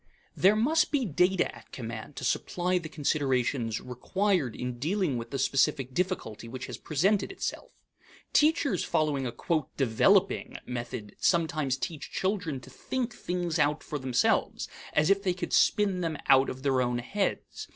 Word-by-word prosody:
There 195 +3 +5
must 290 +10 +3
be 280 -4 +1
data 180 +1 +1
at - - -16
command 115 +2 -7
to - - -7
supply 180 +8 0
the 160 -2 -8
considerations 135 -6 0
required 160 - -1
in 125 -1 -4
dealing 170 0 0
with 115 -1 -5
the 140 - -3
specific 135 -1 +1
difficulty 165 - -2
which 130 +2 -6
has - - -7
presented 190 - +1
itself. 390 - -4 0.6
Teachers 295 - +3
following 145 -4 0
a 120 - -5 0.4
"developing" 180 - +2
method 120 -4 -6
sometimes 155 -6 +1
tell 160 +2 -4
children 185 -5 -2
to - - -13
think 250 -3 -3
things 175 -4 -2
out 150 +1 +2
for 150 - -4
themselves 130 -2 +1 0.3
as 150 +4 +3
if 195 0 +3
they 185 -3 0
could 180 - -4
spin 200 -3 +3
them 165 -3 -2
out 135 -1 +6
of 130 +1 -7
their 135 -2 +2
own 125 -1 0
heads. 195 +12 -3
150 Hz, 155 wpm, -29 LUFS, 130-190 Hz, 0.6 s, out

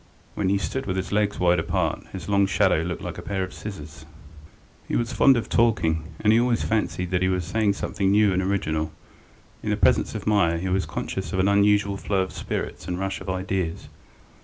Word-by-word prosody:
When 95 -3 -1
he 100 - +3
stood 130 +7 -3
with 95 -1 -1
his 95 - -3
legs 105 0 +1
wide 90 -1 +3
apart, 80 - -1
his 95 - -7
long 100 -1 +3
shadow 100 -2 +3
looked 85 0 -4
like - - -5
a - - -6
pair 95 -2 -2
of 95 - -6
scissors. 80 -7 -8 0.8
He - - -2
was 120 +1 -1
fond 130 +3 +5
of 115 - -2
talking, 80 -9 +2 0.2
and 105 0 +4
he 115 - +5
always 120 -1 +1
fancied 100 -5 -1
that 90 -1 +1
he 95 - +3
was 90 -2 0
saying 105 +2 +1
something 100 0 -1
new 105 0 +4
and 90 - +1
original. 80 -5 -1 0.7
In - - -4
the - - +1
presence - - +2
of - - -5
Meier 100 -6 +3
he 95 +3 -3
was 95 +1 0
conscious 95 +1 -4
of - - -1
an 95 - +3
unusual 100 0 +3
flow 95 -1 0
of 95 - -8
spirits - - -4
and 90 0 -3
rush 95 0 -3
of - - -7
ideas. 95 -2 -2
95 Hz, 215 wpm, -24 LUFS, 90-105 Hz, 0.8 s, fond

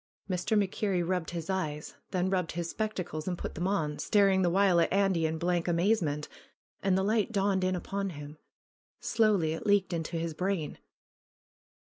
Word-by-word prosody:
Mr. 185 +3 0
MacKerrie 190 -3 0
rubbed 180 -2 -1
his 170 -2 -5
eyes, 155 -6 -3 0.2
then 185 -1 0
rubbed 180 -3 0
his 170 0 -3
spec 215 0 -2
tacles 155 -3 -4
and 180 -1 -1
put - - -5
them 175 +3 -2
on, 155 -7 -1
staring 195 -3 +3
the 180 - +3
while 190 -1 +4
at - - +1
Andy 190 -4 +2
in 160 +1 -2
blank 175 +1 0
amazement, 170 -4 +1 0.5
and 190 -1 +2
the 190 - +1
light 215 +3 +1
dawned 195 -2 +1
in 185 0 +1
upon 195 +2 -3
him. 150 -2 -9 0.6
Slowly 205 -8 +2
it 165 - -5
leaked 200 -2 +3
into 165 0 -2
his 165 0 -2
brain. 180 -2 -2
180 Hz, 175 wpm, -30 LUFS, 165-195 Hz, 0.6 s, while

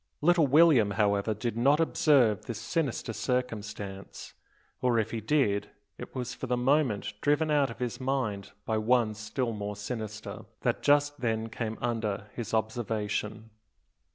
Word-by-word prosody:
Little 165 -1 +4
William, 145 -7 +6
however, 105 0 +2
did 115 +2 -3
not 135 +6 +4
observe 135 - +3
this 115 - -4
sinister 120 -1 -2
circumstance; 105 -5 -4 0.5
or 125 -2 +2
if 110 - 0
he 115 - -3
did, 105 -6 +1 0.3
it - - -9
was 125 -1 -3
for 130 - -6
the 125 0 +1
moment 125 -5 +1
driven 150 +2 +2
out 145 -3 +3
of 115 - -8
his 125 -2 -3
mind 115 -7 -2
by 110 -1 0
one 115 0 +2
still 110 +3 -3
more 105 -1 -4
sinister, 110 0 -6 0.2
that - - 0
just 145 0 +3
then 115 -2 -1
came 110 0 -4
under 110 -3 -2
his 115 -3 -5
observation. 110 -1 -2
115 Hz, 150 wpm, -29 LUFS, 105-130 Hz, 0.5 s, William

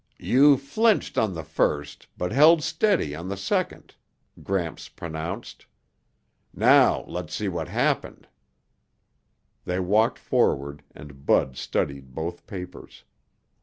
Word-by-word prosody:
"You 140 +2 +5
flinched 210 - +1
on 105 -5 0
the 80 - -5
first 75 -2 -2
but 90 - -3
held 155 +3 +6
steady 195 - +1
on 85 +4 -6
the 100 - -4
second," 100 - -2 0.5
Gramps 90 -4 -3
pronounced. 85 +6 -7 0.9
"Now - - +5
let's 80 -4 -5
see 105 - -2
what 90 -2 -3
happened." - - -1 1.4
They 90 +1 -2
walked 105 +5 +2
forward 70 +1 0
and 70 -2 -13
Bud 65 - +2
studied 65 -1 -3
both 85 +2 -5
papers. 90 -2 -9
90 Hz, 115 wpm, -25 LUFS, 75-110 Hz, 1.4 s, held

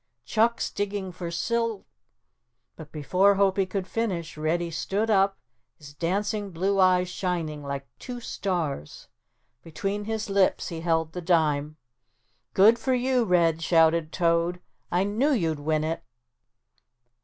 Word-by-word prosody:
"Chuck's 230 +2 +1
digging 200 -2 -3
for 175 -1 -6
sil 230 +4 -1 0.4
" 125 0 -52
but 155 -2 -11
before 185 +7 +3
Hopie 195 -1 +2
could 190 -1 -2
finish 185 -7 -3
Reddy 165 +3 -1
stood 205 +7 -1
up, 195 -1 +3 0.4
his 145 -3 -13
dancing 200 +6 -1
blue 195 +3 0
eyes 185 -1 +4
shining 175 -5 -3
like 140 -1 -5
two 250 -1 -6
stars. 170 - -4 0.5
Between 195 +7 -4
his 220 0 -3
lips 195 -1 +2
he 165 -2 -6
held 165 -1 0
the 180 - -5
dime. 155 -3 +1 0.8
"Good 220 +5 +6
for 260 -1 +1
you, 250 -1 +1
Red," 170 -4 +2
shouted 165 -1 +3
Toad, 170 0 +1 0.3
"I 180 +2 +2
knew 230 +9 +1
you'd 165 - 0
win 155 +1 0
it." 160 +1 -3
180 Hz, 135 wpm, -26 LUFS, 160-200 Hz, 0.8 s, Good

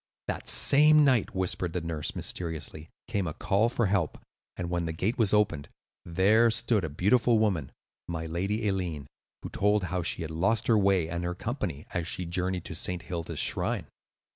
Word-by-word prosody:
That - - -4
same 150 +1 +6
night," 125 -8 +2
whispered 90 -2 -1
the 90 - -2
nurse, 80 -2 -3
mysteriously, 80 -2 -4 0.2
"came 100 -6 -1
a 80 - -5
call 105 +4 +1
for 120 -1 0
help, 95 -6 0 0.4
and 90 - -3
when 85 -1 -2
the 80 - -3
gate 100 +10 -2
was 110 -4 +4
opened, 105 -9 +1 0.4
there 100 +7 +4
stood 115 -2 +1
a 80 - -2
beautiful 110 - +3
woman 95 -11 0 0.4
(my 80 -1 -4
lady 95 +7 -2
Eileen) 90 -7 -2 0.4
who - - -5
told 105 0 +1
how 90 0 -2
she 85 - -1
had 80 - -6
lost 100 +8 +1
her 115 - +4
way 95 -4 +2
and 85 +1 -4
her 90 0 -3
company 75 -4 -4
as 85 -2 -2
she 90 - -4
journeyed 90 +1 -2
to - - -6
St. 90 +2 -3
Hilda's 85 -2 -5
shrine. - - -1
90 Hz, 185 wpm, -28 LUFS, 85-105 Hz, 0.4 s, same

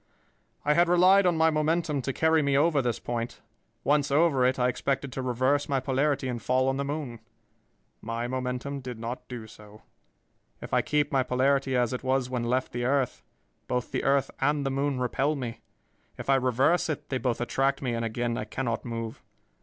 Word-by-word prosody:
"I 150 - +4
had 170 +2 +3
relied 185 +2 +6
on 175 -2 +2
my 160 0 +4
momentum 155 -1 0
to 135 - -2
carry 160 +3 +3
me 140 -1 +2
over 150 -1 +3
this 120 -3 -1
point. 120 0 -4 0.4
Once 145 0 +2
over 140 -2 +3
it, 130 - 0
I 125 -1 +2
expected 135 +2 -1
to 130 - -4
reverse 130 +4 +1
my 135 -1 +2
polarity 135 +1 0
and 120 -2 -3
fall 130 +3 +1
on 135 - -1
the 140 - -1
moon. 140 -5 -4 0.8
My 115 +2 -3
momentum 130 +2 -3
did 125 -3 -7
not 120 +2 -6
do 120 -3 -7
so. 105 0 -15 0.8
If - - -9
I - - +4
keep 150 0 0
my 135 -3 +3
polarity 130 +1 +1
as 125 -1 +1
it 125 - -3
was 130 -1 0
when 125 -2 -1
left 125 +2 0
the 120 0 -3
earth, 135 0 0 0.5
both 125 -1 -2
the 130 - -2
earth 135 0 +2
and 145 +1 +1
the 135 - 0
moon 135 0 -1
repel 135 +4 0
me. 120 -4 -5 0.6
If - - -1
I - - +6
reverse 130 +7 +2
it, 150 -1 -4
they 130 - -1
both 125 -3 -1
attract 135 +3 0
me, 125 -2 -1
and 115 0 -2
again 120 +1 -2
I - - -3
cannot 125 -4 -3
move. 115 -1 -5
130 Hz, 200 wpm, -27 LUFS, 125-145 Hz, 0.8 s, relied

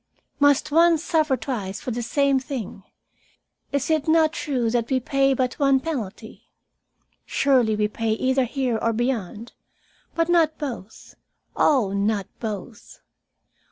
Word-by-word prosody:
"Must 285 0 +3
one 335 +2 +5
suffer 310 -4 +1
twice 205 -9 -4
for 250 - -5
the 240 +1 -3
same 275 +3 +1
thing? 255 -7 -6 0.9
Is 280 +2 -1
it 310 -1 +1
not 315 -1 +3
true 255 -8 -1
that 235 -1 -1
we 265 -1 +2
pay 275 +1 +1
but 255 +2 -2
one 275 -2 +4
penalty? 230 -8 -6 0.8
Surely 250 -6 +2
we 210 0 +1
pay 220 +1 -2
either 260 +3 +1
here 250 -2 -1
or 230 - +1
beyond, 230 -2 -3 0.6
but 330 -1 +1
not 330 -3 +2
both. 235 -8 -7 0.4
Oh, 235 -10 +2
not 200 0 0
both! 215 0 -7
260 Hz, 135 wpm, -23 LUFS, 225-285 Hz, 0.9 s, one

